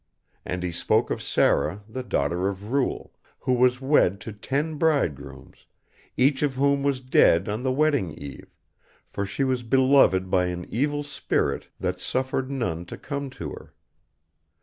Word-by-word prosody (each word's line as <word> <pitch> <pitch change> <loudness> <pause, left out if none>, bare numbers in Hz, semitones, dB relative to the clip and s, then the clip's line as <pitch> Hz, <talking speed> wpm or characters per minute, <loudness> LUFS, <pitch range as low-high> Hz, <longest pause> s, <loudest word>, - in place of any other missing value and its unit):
And 90 0 -4
he 90 - -2
spoke - - +1
of - - -2
Sara 100 +2 +1
the 130 +4 -5
daughter 90 - 0
of 100 +3 -7
Ruel, 135 -1 -1 0.3
who 130 - +1
was 125 0 +3
wed 130 -9 +3
to 110 - -7
ten 145 +8 -2
bridegrooms, 75 - -2 0.5
each 135 +2 +3
of 145 -3 0
whom 140 +1 +2
was 140 -2 0
dead 95 -8 +4
on 105 +3 -2
the 130 0 0
wedding 145 - +1
eve; 70 -2 -9 0.6
for 100 - -3
she 120 +8 -2
was 130 -2 0
beloved 125 -7 +4
by 90 -1 +3
an 90 -1 -4
evil 145 +5 0
spirit 145 - -1
that - - -2
suffered 130 0 -1
none 90 -12 -2
to - - -8
come 140 -1 -5
to 130 - -7
her. - - -11
125 Hz, 160 wpm, -25 LUFS, 95-140 Hz, 0.6 s, dead